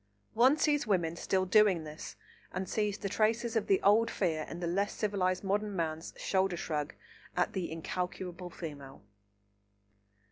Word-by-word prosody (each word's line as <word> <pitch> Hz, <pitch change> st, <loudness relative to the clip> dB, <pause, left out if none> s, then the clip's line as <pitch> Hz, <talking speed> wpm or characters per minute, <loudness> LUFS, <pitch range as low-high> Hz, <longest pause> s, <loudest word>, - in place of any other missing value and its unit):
One 255 Hz, +6 st, +5 dB
sees 295 Hz, -5 st, +2 dB
women 170 Hz, -5 st, +1 dB
still 185 Hz, +2 st, 0 dB
doing 190 Hz, -3 st, +4 dB
this, 155 Hz, 0 st, -8 dB, 0.4 s
and 185 Hz, +1 st, -3 dB
sees 210 Hz, 0 st, 0 dB
the 200 Hz, -, -3 dB
traces 225 Hz, +3 st, +1 dB
of 225 Hz, -, +1 dB
the 195 Hz, -, +4 dB
old 215 Hz, +3 st, +5 dB
fear 160 Hz, -5 st, -1 dB
in 170 Hz, -, -6 dB
the 175 Hz, -, -2 dB
less 195 Hz, +4 st, 0 dB
civilised 190 Hz, -3 st, 0 dB
modern 205 Hz, +1 st, 0 dB
man's 160 Hz, -1 st, -3 dB
shoulder 190 Hz, -2 st, +1 dB
shrug 150 Hz, -3 st, -3 dB, 0.4 s
at 180 Hz, -, +1 dB
the 185 Hz, -4 st, -3 dB
incalculable 180 Hz, +2 st, -4 dB
female. 140 Hz, -, -8 dB
185 Hz, 150 wpm, -32 LUFS, 170-210 Hz, 0.4 s, One